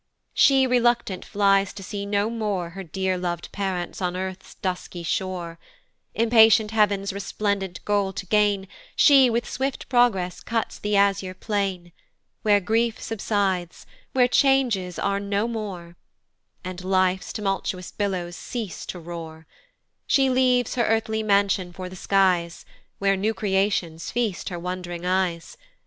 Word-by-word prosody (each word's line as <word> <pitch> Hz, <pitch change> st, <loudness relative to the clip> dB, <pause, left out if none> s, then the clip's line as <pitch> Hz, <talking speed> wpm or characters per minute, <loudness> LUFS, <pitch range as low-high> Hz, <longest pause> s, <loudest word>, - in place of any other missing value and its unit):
She 270 Hz, -1 st, +5 dB
unreluctant 240 Hz, -6 st, +1 dB
flies 195 Hz, -1 st, +2 dB
to 195 Hz, -, -9 dB
see 200 Hz, +1 st, -5 dB
no 205 Hz, +2 st, 0 dB
more 205 Hz, -7 st, -2 dB
Her 195 Hz, +2 st, -7 dB
dear 190 Hz, +1 st, -2 dB
lov'd 175 Hz, -1 st, -4 dB
parents 190 Hz, -2 st, -3 dB
on 180 Hz, -1 st, -1 dB
earth's 190 Hz, 0 st, -6 dB
dusky 180 Hz, -2 st, -4 dB
shore: 170 Hz, -1 st, -3 dB, 0.6 s
Impatient 225 Hz, -1 st, +5 dB
heav'n's 200 Hz, -3 st, +1 dB
resplendent 200 Hz, -1 st, -3 dB
goal 205 Hz, -2 st, +1 dB
to 195 Hz, -, -5 dB
gain, 205 Hz, -1 st, +2 dB, 0.3 s
She 270 Hz, -4 st, +6 dB
with 235 Hz, +1 st, -1 dB
swift 270 Hz, +1 st, -3 dB
progress 200 Hz, -8 st, +2 dB
cuts 225 Hz, -1 st, -3 dB
the 210 Hz, 0 st, -1 dB
azure 195 Hz, -2 st, +2 dB
plain, 190 Hz, -4 st, -2 dB, 0.5 s
Where 205 Hz, -1 st, +4 dB
grief 225 Hz, +4 st, 0 dB
subsides, 195 Hz, -5 st, -2 dB, 0.3 s
where 250 Hz, -1 st, +4 dB
changes 250 Hz, -, +2 dB
are 200 Hz, 0 st, 0 dB
no 200 Hz, +2 st, -1 dB
more, 195 Hz, -7 st, -6 dB, 0.7 s
And 180 Hz, 0 st, -6 dB
life's 185 Hz, 0 st, +1 dB
tumultuous 195 Hz, -3 st, -3 dB
billows 185 Hz, -4 st, -3 dB
cease 225 Hz, -4 st, -6 dB
to 180 Hz, -, -6 dB
roar; 160 Hz, -1 st, -8 dB, 0.6 s
She 270 Hz, -1 st, +3 dB
leaves 250 Hz, -2 st, +2 dB
her 245 Hz, -, +1 dB
earthly 220 Hz, 0 st, 0 dB
mansion 200 Hz, -3 st, +2 dB
for 185 Hz, +1 st, -7 dB
the 185 Hz, -, -10 dB
skies, 180 Hz, -3 st, +1 dB, 0.3 s
Where 195 Hz, 0 st, +2 dB
new 215 Hz, +3 st, -1 dB
creations 190 Hz, -5 st, 0 dB
feast 230 Hz, -6 st, -2 dB
her 175 Hz, -, -5 dB
wond'ring 175 Hz, 0 st, -5 dB
eyes. 180 Hz, -2 st, -1 dB
195 Hz, 135 wpm, -24 LUFS, 180-220 Hz, 0.7 s, She